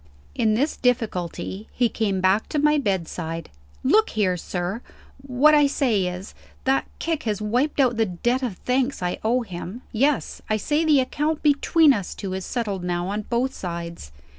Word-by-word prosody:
In 215 -1 +2
this 285 +7 0
difficulty, 215 -5 -1
he 245 - +2
came 205 -4 -1
back 190 +3 +2
to 305 - -2
my 300 0 +3
bedside. 165 - -3 0.3
"Look 430 +12 +4
here, 195 -4 +1
sir! 180 +5 -4 0.4
What 275 +3 +4
I 295 -1 +6
say 230 -10 +1
is 180 +2 -6 0.3
that 270 +1 +1
kick 325 -2 -2
has 210 - -1
wiped 245 +9 0
out 250 -4 +3
the 225 -1 +2
debt 240 +9 0
of 235 -8 -3
thanks 255 -3 -1
I 180 - -2
owe 240 +3 +2
him. 190 +3 -7
Yes. 275 +5 0
I 215 - +2
say 295 +9 0
the 300 -4 +5
account 295 +4 -1
between 300 +1 +5
us 200 -6 -4
two 195 -2 -5
is 190 0 -4
settled 205 -7 -2
now, 175 0 -2
on 210 +1 -3
both 250 +2 0
sides. 170 - -6
225 Hz, 175 wpm, -24 LUFS, 185-270 Hz, 0.4 s, I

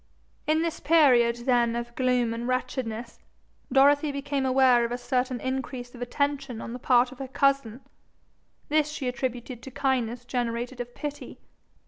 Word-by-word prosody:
In 315 +1 +2
this 335 -1 -2
period 255 -7 +5
then 240 -3 +2
of 240 0 -4
gloom 250 -2 +1
and 235 +1 -4
wretchedness, 245 -2 -3 0.5
Dorothy 285 +3 +4
became 280 -1 -2
aware 255 -2 +5
of 235 - -2
a 245 - -1
certain 250 0 -1
increase 260 -1 -4
of 245 - -11
attention 275 -1 -2
on 230 - -6
the 250 - -6
part 250 0 +3
of 260 - -13
her 270 - -5
cousin. 270 -3 +1 0.9
This 300 0 +2
she 295 -3 -4
attributed 250 -1 -4
to 265 - -9
kindness 250 -3 -1
generated 245 0 -3
of 245 0 -8
pity. 290 -1 -6
255 Hz, 155 wpm, -27 LUFS, 240-275 Hz, 0.9 s, period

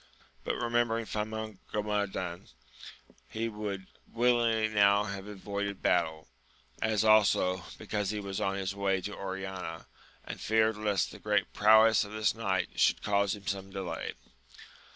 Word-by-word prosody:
Yet, - - 0
remembering 120 -1 0
Famongomadan, 105 -4 -3 0.8
he 115 +1 -2
would 105 -3 -5 0.3
willingly 115 -2 +2
now 100 -1 +4
have 100 -1 -6
avoided 100 -1 -4
battle; 80 0 +1 0.5
as 110 -1 +2
also, 95 -4 +4
because 105 -2 -2
he 105 0 -2
was 100 -1 -4
on 95 0 0
his 100 0 -2
way 100 -1 0
to 105 +2 -5
Oriana, 95 -3 -5 0.4
and - - -7
feared 110 0 +2
lest 105 -3 0
the - - -11
great - - 0
prowess 110 +2 +6
of 105 +1 -9
this 110 0 +1
knight 95 -5 -2
should - - +3
cause 100 -1 +1
him 100 -1 -13
some 95 0 -3
delay. 95 -2 -4
105 Hz, 135 wpm, -30 LUFS, 95-110 Hz, 0.8 s, prowess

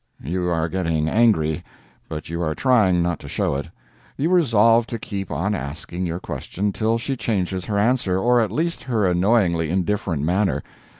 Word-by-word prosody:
You 90 +5 -1
are 80 -1 0
getting 80 -4 -1
angry, 80 -8 +2 0.5
but 75 -1 -6
you 85 +1 -4
are 80 -2 -1
trying 105 -10 +3
not 85 -2 -1
to - - -10
show - - 0
it; 70 +1 -4 0.5
you 150 +5 0
resolve 115 - +4
to 115 - -4
keep 100 -4 -5
on 95 +9 -1
asking 85 +2 -4
your 85 +1 -3
question 100 +2 -3
till 110 +1 +1
she 135 +4 -3
changes 95 -6 -2
her 105 - -2
answer, 105 -4 +2
or 120 +4 +3
at 110 -4 -1
least 170 +8 -1
her 115 -5 +1
annoyingly 90 -3 +2
indifferent 95 -3 -1
manner. 95 +5 +1
95 Hz, 175 wpm, -22 LUFS, 85-115 Hz, 0.5 s, resolve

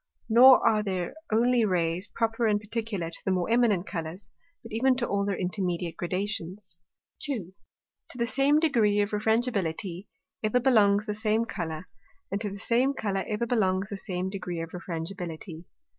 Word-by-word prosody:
Nor 250 +3 +8
are 215 -2 +3
there 185 -4 -3 0.2
only 240 +2 +3
Rays 180 -1 0
proper 225 0 0
and 210 -1 +2
particular 210 -5 -4
to - - -6
the - - -1
more 185 +2 0
eminent 225 -6 +3
Colours, 170 +2 -6 0.3
but 230 - -11
even 255 +4 +3
to 240 -1 -1
all 200 0 0
their 200 -2 -1
intermediate 180 -2 -2
Gradations. 185 -1 -4 0.4
2. 215 - -2 0.6
To - - -9
the 235 - +1
same 275 +5 +3
degree 230 -10 +3
of 205 - -1
Refrangibility 205 -5 -1 0.3
ever 215 +3 +2
belongs 215 -5 +4
the 210 - -2
same 215 +2 +1
Colour, 160 -5 -5 0.5
and 200 +1 -2
to 210 - -1
the 200 - -7
same 245 +6 +2
Colour 195 -5 -1
ever 215 +2 -1
belongs 195 -5 +1
the 200 - -4
same 190 -2 -3
degree 180 -3 -4
of 165 0 -5
Refrangibility. 170 -1 -6
205 Hz, 165 wpm, -27 LUFS, 180-230 Hz, 0.6 s, Nor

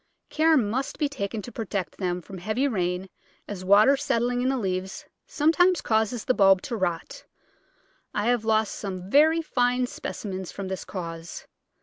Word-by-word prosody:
Care 320 0 +4
must 250 +3 -1
be 300 - +1
taken 220 -6 -4
to 245 - -8
protect 200 -8 -4
them 180 -2 -2
from 190 +1 -9
heavy 215 +9 0
rain, 180 -5 -1 0.4
as 195 -3 -6
water 210 +8 +6
set 275 -3 0
tling 245 +1 0
in 255 - +1
the 270 - 0
leaves 190 -2 -3 0.2
sometimes 345 +3 +3
causes 220 +1 0
the - - +3
bulb 195 -4 +5
to 235 - -4
rot. 175 -5 -3 0.9
I 210 - -2
have 240 -1 +2
lost 220 -1 +1
some 190 -1 -6
very 320 +3 +5
fine 250 -3 +1
specimens 190 -6 -6
from 195 -1 -6
this 190 -1 -5
cause. 165 -3 -7
215 Hz, 165 wpm, -26 LUFS, 190-255 Hz, 0.9 s, water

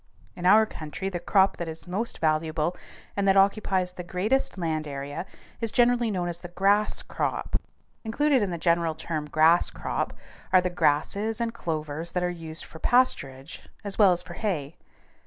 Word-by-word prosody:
In 180 0 -1
our 220 +3 +7
country 185 0 -5
the 180 -2 -4
crop 190 +2 +3
that 170 - -4
is 160 0 -6
most 205 +6 -2
valuable 155 +1 0 0.4
and 200 -1 0
that 195 0 +5
occupies 195 -2 +2
the 180 - -7
greatest 200 +8 0
land 160 -3 -2
area 140 +5 -5 0.3
is 230 -2 -2
generally 240 -1 +3
known 180 -4 -1
as 170 -1 -4
the 175 - -8
grass 195 +4 +1
crop. - - -2 0.4
Included 270 +4 +2
in 205 - 0
the 170 - -3
general 170 -1 +1
term 155 -1 -4
"grass 160 +3 +5
crop" - - -3 0.4
are 185 - +7
the 180 0 -1
grasses 200 +8 +1
and 230 -1 -1
clovers 155 -2 -4
that 180 - 0
are 180 - 0
used 165 -2 -6
for 160 - -12
pasturage 145 - +1 0.2
as 200 0 -4
well 200 -3 +7
as 175 0 0
for 180 -1 -9
hay. 165 -8 -3
180 Hz, 175 wpm, -26 LUFS, 160-200 Hz, 0.4 s, our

